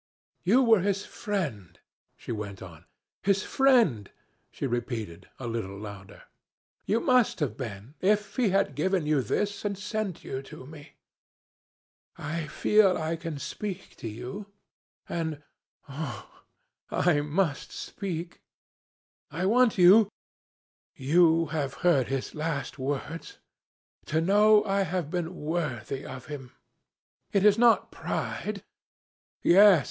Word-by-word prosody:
"'You 235 +9 +4
were 225 -4 +5
his 200 +1 -1
friend,' 140 - -4 0.4
she - - -8
went 100 -4 -5
on. 85 -2 -12 0.4
'His 195 -1 +2
friend,' 235 - +3 0.4
she - - -5
repeated, 115 -7 -4
a 130 - -6
little 110 -4 -4
louder. 100 -1 -10 0.6
'You 220 - +2
must 250 -7 +3
have 135 -9 -1
been, 110 0 -7
if 210 +2 +1
he 245 -5 +2
had 195 +1 +1
given 185 -4 0
you 150 -2 +2
this, 205 +9 -2
and 200 -2 -2
sent 210 -2 -4
you 130 - -4
to 135 -1 -11
me. 145 +1 -12 1.2
I 155 +2 -4
feel 205 +2 +3
I 160 +1 -2
can 165 -2 -5
speak 190 +7 -6
to - - -6
you 125 - -7 0.6
and 160 -3 -3 0.4
oh! 140 -5 -6 0.6
I 160 -5 +2
must 150 +1 -1
speak. 175 -4 -6 0.9
I 170 +5 -3
want 235 +2 +4
you 195 +4 +7 0.9
you 135 +1 -4
who 165 -1 +5
have 140 -4 -2
heard 140 -8 +4
his 135 -1 -3
last 155 -3 -3
words 145 - -4 0.7
to 155 - +1
know 210 +4 +5
I 200 -1 +1
have 175 -4 -2
been 175 0 -3
worthy 150 -6 -3
of 130 -2 -8
him.... 135 -5 -8 0.8
It 200 0 +2
is 210 +1 +5
not 235 -1 +4
pride.... - - -4 0.8
Yes! 195 0 +7
165 Hz, 130 wpm, -28 LUFS, 135-200 Hz, 1.2 s, you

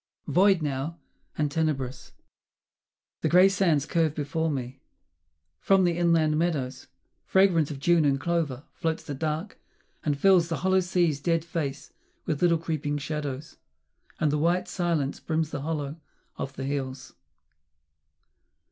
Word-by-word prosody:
Void 190 -2 +4
now 145 +3 -3 0.4
and 150 -2 0
tenebrous, 140 -5 -2 1.1
The - - +1
grey 180 +2 +7
sands 180 -7 +2
curve 160 -3 +1
before 160 +2 -1
me.... 130 -2 -4 0.8
From 195 -1 +4
the 175 -2 +2
inland 165 -3 +2
meadows, 150 -7 -2 0.4
Fragrant 185 -6 +3
of 145 -3 -6
June 170 +3 +3
and 140 -2 +2
clover, 150 -4 -1
floats 160 0 -2
the 145 - -5
dark, 155 +6 -3 0.4
and 145 -2 0
fills 180 +1 +5
The 165 - -1
hollow 190 0 +4
sea's 175 -5 +1
dead 165 +2 0
face 150 -4 -4 0.3
with 150 -3 -2
little 170 -2 +4
creeping 155 -3 -2
shadows, 145 0 -5 0.6
And 155 -2 +2
the 150 - 0
white 175 +3 +1
silence 170 -6 -1
brims 160 -1 -1
the 145 - -4
hollow 150 -1 -3 0.4
of 135 0 -5
the 135 - -5
hills. 135 -1 -4
155 Hz, 140 wpm, -27 LUFS, 140-170 Hz, 1.1 s, grey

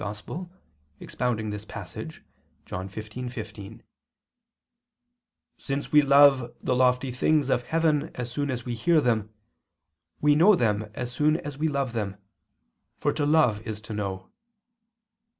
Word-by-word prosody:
] 75 - -36
expounding 110 -4 -2
this 105 0 -6
passage - - -8 0.4
[*John 95 +1 -5
15:15] 110 -1 -7
says: - - -36 1.8
"Since 140 0 -4
we 150 - +7
love 140 -3 +5
the 125 - 0
lofty 125 +1 +2
things 140 +2 +2
of 125 - +1
heaven 160 -3 +1
as 125 -1 -5
soon 145 +2 -2
as 125 -3 -3
we 120 - -3
hear 155 +8 +3
them, 110 -6 0 0.9
we 150 0 +4
know 180 +8 +6
them 110 -6 0
as 125 -1 -4
soon 150 +5 +2
as 145 -3 -7
we 160 - +2
love 140 -4 -1
them, 100 -4 -3 0.8
for - - 0
to 145 - 0
love 145 -9 +3
is 110 -1 -6
to 110 +1 -8
know. 95 -2 -4
125 Hz, 140 wpm, -26 LUFS, 110-145 Hz, 1.8 s, we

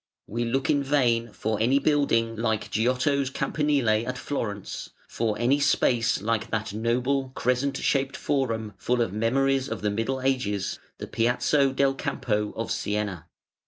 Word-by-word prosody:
We 120 +3 -2
look 135 +4 0
in 145 - +2
vain 120 -5 +1
for 110 0 -2
any 125 +5 +4
building 140 -6 +2
like 110 -1 -1
Giotto's 130 +4 +1
Campanile 130 -7 +1
at 130 0 -3
Florence, 105 -8 -4 0.2
for 110 -2 -1
any 125 +5 +2
space 120 -6 +2
like 115 0 0
that 110 -2 -2
noble, 125 +5 0
crescent 130 +2 0
shaped 135 -1 0
Forum, 115 -6 -1
full 120 -1 +1
of 95 - -4
memories 135 +5 +1
of - - -4
the 105 - +1
Middle 115 +6 -1
Ages, 115 -7 -1 0.2
the - - -6
Piazzo 125 +4 +2
del 135 0 +2
Campo 110 -7 -2
of 115 - -3
Siena. 100 -5 -2
120 Hz, 150 wpm, -26 LUFS, 110-135 Hz, 0.2 s, any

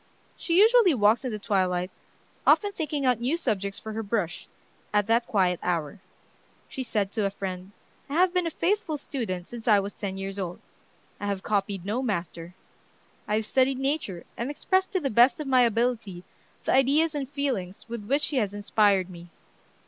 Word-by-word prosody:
She 335 0 -1
usually 435 - +6
walks 215 +2 +3
at - - -1
the 215 - -3
twilight, 185 -4 0 0.6
often 410 -1 +5
thinking 300 -6 -3
out 250 -3 +3
new 260 +8 0
subjects 200 - -2
for 220 - -7
her 225 - -3
brush, 205 -5 -2 0.4
at 210 -1 +2
that 230 +2 +2
quiet 185 -4 +1
hour. 170 +1 -2 0.7
She 265 - -6
said 210 -6 -1
to 210 -1 -1
a - - +2
friend: 190 -1 -6 0.4
"I 280 - -3
have 360 +1 +4
been 360 -2 +1
a - - 0
faithful 350 -1 -1
student 215 -11 -4
since 240 -1 -9
I 210 -3 +6
was 200 +1 -4
ten 195 -1 -5
years 195 +1 -5
old. 180 -2 -4 0.6
I 205 - -4
have 200 -2 -2
copied 200 -3 -1
no 220 +6 -1
master. 175 -6 -4 0.7
I 210 - +1
have 220 0 0
studied 260 +3 +2
Nature, 270 - -2
and 235 +3 -3
expressed 375 +6 0
to 375 - +2
the 275 -5 -2
best 240 +6 +5
of 305 - -4
my 260 -2 +4
ability 230 -5 0 0.4
the - - +1
ideas 290 +5 +3
and 280 -3 -3
feelings 260 -11 -3
with 230 -3 -6
which 280 +4 +1
she 290 - -1
has 205 -4 0
inspired 205 -2 +2
me. 175 -2 -11
220 Hz, 185 wpm, -26 LUFS, 195-275 Hz, 0.7 s, usually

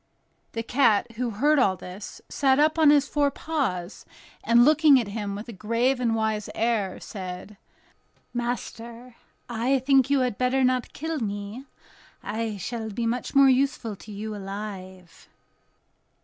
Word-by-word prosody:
The 230 - -3
cat, 230 -4 +2
who 240 +2 -3
heard 285 +8 +2
all 195 -7 +3
this, 185 +2 -9
sat 265 -2 +2
up 310 +2 +3
on 310 -2 +6
his 290 -1 +4
four 290 -1 +1
paws, 240 - -3 0.4
and 235 +1 +5
looking 300 -2 +6
at 225 -4 -3
him 200 -1 -4
with 210 +4 -7
a 235 - -8
grave 230 +6 0
and 230 -2 +1
wise 220 -1 -1
air, 220 -5 0
said: 185 +1 -8 0.8
"Master, 240 0 -5 0.3
I 240 +3 +1
think 265 0 +3
you 280 -2 +3
had 250 -5 -1
better 255 +1 +2
not 255 -1 0
kill 320 +1 -3
me; 205 +3 -5 0.6
I 220 0 -3
shall 220 +3 -5
be 230 +3 -3
much 240 +4 -3
more 275 0 +7
useful 265 -4 +1
to 215 - -12
you 210 +1 -5
alive." 195 -3 -8
235 Hz, 150 wpm, -25 LUFS, 210-265 Hz, 0.8 s, more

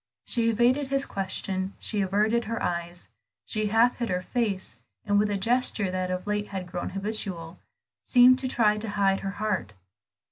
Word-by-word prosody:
She 230 -2 +2
evaded 245 +5 +2
his 275 0 +1
question, 190 0 -3
she 210 -2 -1
averted 215 +5 +1
her 230 +1 -3
eyes, 175 0 -3 0.4
she 215 -1 -1
half 225 +4 +3
hid 235 -1 -3
her 180 0 -1
face, 195 - -2 0.3
and 205 0 +2
with 210 0 +1
a 205 - 0
gesture 225 -3 +2
that 185 0 -2
of 185 0 -3
late 210 0 -2
had 190 -2 -5
grown 175 0 -5
habitual, 195 -5 -4 0.4
seemed 255 0 +6
to 260 - -2
try 215 -4 +2
to 220 0 -2
hide 195 -1 +1
her 195 - -4
heart. 210 - -2
205 Hz, 175 wpm, -26 LUFS, 190-230 Hz, 0.4 s, seemed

